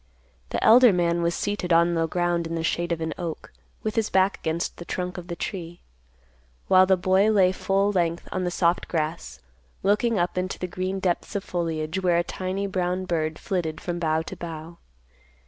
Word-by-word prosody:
The - - -2
elder 245 +1 +8
man 170 -2 +1
was 170 0 0
seated 205 -3 -2
on 170 +1 +4
the 165 -1 +1
ground 175 0 0
in 165 - -4
the 165 - -2
shade 170 +1 -1
of 165 -1 -1
an 160 0 -2
oak, 170 -3 -6 0.3
with 215 - -1
his 225 -2 +1
back 190 +1 +2
against 165 +2 -2
the - - -7
trunk 180 +1 -4
of 175 - -10
the 170 - -4
tree, 175 -2 -6 0.9
while 185 0 +6
the 190 0 +4
boy 190 +3 +3
lay 195 -4 +4
full 195 +2 +1
length 170 -3 -1
on 185 - -2
the 180 - 0
soft 175 0 +1
grass, 150 - -3 0.4
looking 210 +3 +2
up 175 0 0
into 185 +1 -3
the - - -3
green 185 +2 -3
depths 185 +2 -1
of 200 - -1
foliage 165 0 -2
where 175 -2 +3
a 170 - +2
tiny 185 +3 -3
brown 185 -1 -1
bird 160 -3 -1
flitted 165 -5 -3
from 175 -1 -4
bough 160 -1 +1
to - - -7
bough. 165 0 -8
175 Hz, 200 wpm, -25 LUFS, 170-190 Hz, 0.9 s, elder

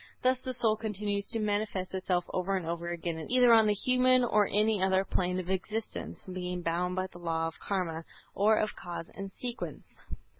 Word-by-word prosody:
Thus 255 0 +3
the 255 0 -4
soul 225 -3 +3
continues 205 -2 -2
to - - -1
manifest 205 -3 -1
itself 185 -2 0
over 190 +1 0
and 180 - -4
over 170 +1 -3
again 170 -1 -3
either 245 -1 +6
on 220 -1 +6
the 210 - +3
human 255 +3 +4
or 210 -4 +3
any 210 0 +2
other 190 0 +3
plane 180 -1 0
of 185 0 -4
existence, 215 +4 -4
being 180 -1 -4
bound 175 +2 0
by 185 0 0
the 180 -2 -11
Law 165 -1 -1
of 165 - -8
Karma 170 -5 -2 0.3
or 215 +2 +4
of 215 - 0
Cause 170 -1 -7
and 195 -1 -6
Sequence. 245 +4 -6
195 Hz, 190 wpm, -30 LUFS, 180-220 Hz, 0.3 s, either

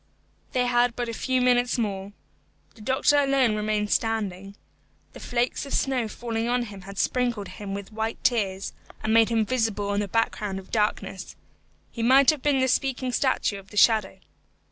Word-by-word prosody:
They 250 -2 +2
had 245 -1 +2
but 240 -1 -3
a - - -4
few 255 +2 0
minutes 245 0 +2
more. 200 -3 -3 0.6
The 220 - -16
doctor 265 +5 +3
alone 275 -5 +3
remained 210 0 -1
standing. 200 -4 -1 0.6
The - - -11
flakes 245 0 -1
of - - -2
snow 255 -4 0
falling 230 +1 -3
on 245 0 +1
him 200 -4 -9
had 195 +1 -10
sprinkled 240 -5 0
him 200 -1 -6
with 200 +2 -8
white 220 +1 -2
tears, 195 -5 0 0.3
and 220 - +1
made 225 0 +5
him 225 -2 +1
visible 220 -4 -1
on 200 0 0
the 205 - -1
background 210 -2 -1
of 190 -1 -10
darkness. 205 -3 -2 0.6
He 230 - -6
might 265 +5 +6
have 300 -3 -6
been 290 -1 +2
the 260 - +3
speaking 260 0 0
statue 245 -6 0
of 195 0 -16
the 210 - -10
shadow. 215 -4 +4
225 Hz, 180 wpm, -25 LUFS, 205-250 Hz, 0.6 s, might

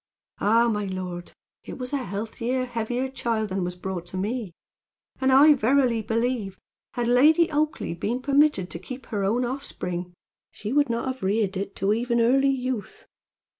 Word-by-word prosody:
"Ah! 230 +3 +4
my 210 -3 0
lord, 180 -2 -5 0.3
it - - -8
was 250 +1 -6
a - - +2
healthier, 230 +3 -3
heavier 245 +2 -2
child 230 -5 -2
than 190 0 -1
was 180 0 -3
brought 180 -1 -5
to 185 - -6
me; 210 +1 -2 0.7
and 265 0 +2
I 290 +3 +8
verily 255 -2 +2
believe 225 -3 -1 0.4
had 240 -1 -1
Lady 305 +8 +5
Oakleigh 300 - -1
been 240 +7 -1
permitted 280 -8 +2
to 170 - -5
keep 255 +8 -8
her 205 -4 -3
own 230 +6 +1
offspring, 180 -9 -5 0.3
she 215 +3 -6
would 290 -2 +3
not 235 0 -1
have 260 -1 -4
reared 200 0 0
it 195 +1 -4
to 195 +2 +1
even 235 +1 0
early 270 +4 +4
youth. 255 -4 -3
235 Hz, 170 wpm, -25 LUFS, 200-260 Hz, 0.7 s, I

